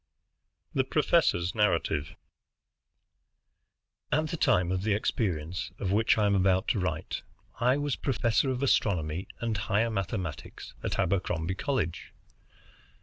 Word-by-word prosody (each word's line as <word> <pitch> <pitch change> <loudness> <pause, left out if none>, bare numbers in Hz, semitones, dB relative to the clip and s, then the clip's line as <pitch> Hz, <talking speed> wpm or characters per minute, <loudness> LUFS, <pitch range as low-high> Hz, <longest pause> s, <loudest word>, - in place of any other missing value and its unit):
THE - - +2
PROFESSOR'S 85 +1 +2
NARRATIVE 80 -8 0 2.0
At 155 +1 +1
the - - -2
time 90 - +2
of 95 0 0
the 105 0 +1
experience 90 -5 -2
of 95 - -2
which 110 +3 +3
I 105 - +3
am 100 - +3
about 95 -1 +2
to 105 - +1
write, 80 -3 -2 0.4
I 125 +3 +3
was 145 -2 -1
professor 130 -1 +1
of 130 +1 -1
astronomy 90 - +1
and 115 -2 -1
higher 105 +3 +1
mathematics 95 -5 -4
at - - -2
Abercrombie 90 -1 0
College. 100 - -2
100 Hz, 125 wpm, -29 LUFS, 90-115 Hz, 2.0 s, which